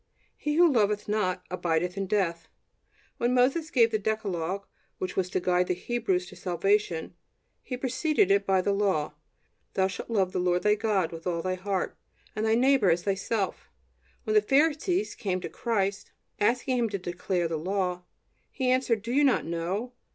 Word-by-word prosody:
"He 295 0 -2
who 345 +2 +6
loveth 210 -3 +1
not... 185 -4 0
abideth 180 0 0
in 195 -1 -3
death." 180 -5 0 0.7
When 240 +1 +1
Moses 275 +6 +2
gave 235 -7 +4
the 215 - +1
decalogue 200 -3 -2 0.3
which 185 - -4
was 185 -1 0
to - - 0
guide 180 0 +1
the 180 - 0
Hebrews 190 -3 -1
to - - -12
salvation, 180 -1 0 0.5
he 250 - -5
preceded 260 - +1
it 200 0 +4
by 190 -1 +2
the 200 - +1
law: 190 -7 0 0.6
"Thou 190 - +3
shalt 190 - -5
love 195 -5 +1
the - - -1
Lord 180 0 +1
thy 210 - +4
God 205 -5 0
with 165 +1 -7
all 170 -2 -1
thy 185 - 0
heart, 190 0 -2 0.4
and 220 +1 0
thy 220 - +4
neighbor 260 -4 +4
as 170 +1 +2
thyself." 195 0 -2 0.5
When 215 - -1
the 215 - +6
Pharisees 315 - +2
came 190 -6 -2
to - - -5
Christ, 200 -4 -2 0.3
asking 245 +4 +1
Him 230 -2 +1
to 200 - -2
declare 175 -1 -2
the 165 -1 -2
Law, 180 +1 -1 0.5
He 255 -2 0
answered: 250 -5 +1
"Do 230 - -4
you 290 +2 +4
not 270 -3 +3
know? 180 +9 -3
200 Hz, 180 wpm, -28 LUFS, 180-235 Hz, 0.7 s, who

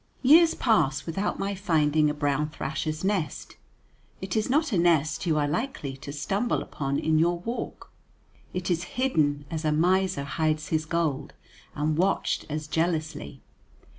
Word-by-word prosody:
Years 325 +5 +6
pass 155 - +2
without 195 +5 -2
my 195 +1 -2
finding 155 -5 +2
a 150 - -2
brown 150 0 0
thrasher's 155 +2 -4
nest; 190 -7 -2 0.6
it 190 -1 -4
is 215 +1 0
not 300 +2 +2
a 200 - +1
nest 165 0 +2
you 155 -2 +2
are 145 -1 +1
likely 150 - -3
to 140 +1 -8
stumble 195 +11 -1
upon 140 -1 -3
in 155 -1 +2
your 170 +2 +2
walk; 230 +8 -6 0.6
it 180 0 -3
is 175 0 0
hidden 150 - +1
as 160 -1 -3
a 155 - +1
miser 180 0 +2
hides 155 +2 -1
his 155 0 0
gold, 155 -4 -1 0.4
and 150 +1 0
watched 195 +2 0
as 150 +1 -3
jealously. 155 -3 -2
160 Hz, 155 wpm, -26 LUFS, 150-190 Hz, 0.6 s, Years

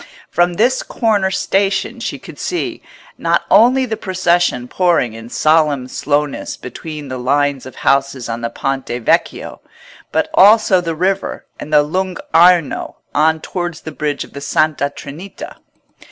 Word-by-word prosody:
From 175 +1 +2
this 245 +7 +2
corner 210 -5 0
station 195 +1 0
she - - -4
could - - -12
see, 355 - -3 0.4
not - - +1
only 250 +6 +5
the 220 -3 -3
procession 175 - 0
pouring 170 -8 +1
in 115 +1 -10
solemn 150 -3 +2
slowness 145 +2 -2
between 150 +3 -8
the 130 -1 -5
lines 140 +1 0
of 130 - -11
houses 135 -2 0
on 115 0 -4
the 115 - -2
Ponte 135 +3 -3
Vecchio, 120 -1 -1 0.5
but - - +1
also 205 -2 +6
the 165 -2 -3
river 190 +4 -1
and 155 - -8
the 150 -1 +5
Lung' 185 +4 -2 0.2
Arno 170 -1 +4 0.2
on 160 +1 +2
towards 175 -2 -4
the 160 - -7
bridge 150 -1 -2
of - - -15
the 140 - -7
Santa 145 0 +1
Trinita. 150 +7 -9
155 Hz, 150 wpm, -17 LUFS, 140-185 Hz, 0.5 s, also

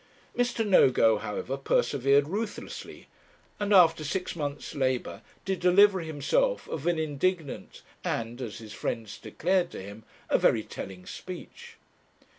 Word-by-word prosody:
Mr. 245 -2 0
Nogo, 120 - +5
however, 115 +6 -4
persevered 140 +1 +2
ruthlessly, 205 +5 -6 0.5
and 205 0 -1
after 165 -5 +6
six 180 +5 -3
months' 145 -3 -4
labour, 130 -3 -1 0.2
did 190 -1 -1
deliver 190 +2 +5
himself 480 - 0
of 160 +1 -4
an 175 -1 +2
indignant, 160 +1 -2 0.2
and, 115 +2 -3
as 115 -4 -5
his 110 -2 -10
friends 110 0 -4
declared 180 +1 0
to - - -8
him, 100 +3 -9 0.2
a - - +2
very - - +3
telling 90 -1 -8
speech. 455 - -9
155 Hz, 130 wpm, -28 LUFS, 130-190 Hz, 0.5 s, after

